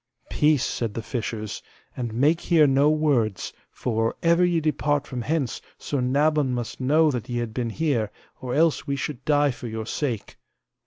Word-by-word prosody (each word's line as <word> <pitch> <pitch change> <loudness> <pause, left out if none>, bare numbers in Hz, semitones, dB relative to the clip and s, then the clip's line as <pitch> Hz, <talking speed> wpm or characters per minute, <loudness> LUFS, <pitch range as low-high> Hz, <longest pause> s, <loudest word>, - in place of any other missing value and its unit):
Peace, 150 -3 +3
said 115 -3 -3
the 115 - -4
fishers, 115 -2 -4 0.3
and 120 -3 -3
make 145 +9 +2
here 165 -4 +4
no 140 +1 +4
words, 140 -10 +1 0.2
for 115 -2 -1
or 115 - -1
ever 170 +1 +4
ye 175 -2 +3
depart 145 -1 0
from 125 -4 -5
hence 140 0 -1 0.2
Sir 140 -3 -2
Nabon 140 +1 +2
must 120 +1 -5
know 150 +4 +4
that 125 -3 -4
ye 120 - -2
have 120 -2 -3
been 120 -1 -2
here, 125 -5 0 0.3
or 125 -1 -3
else 160 0 +2
we 140 - 0
should 135 -1 -4
die 145 -1 +3
for 120 0 -8
your 110 -1 -4
sake. 120 -3 -3
135 Hz, 180 wpm, -24 LUFS, 120-150 Hz, 0.3 s, here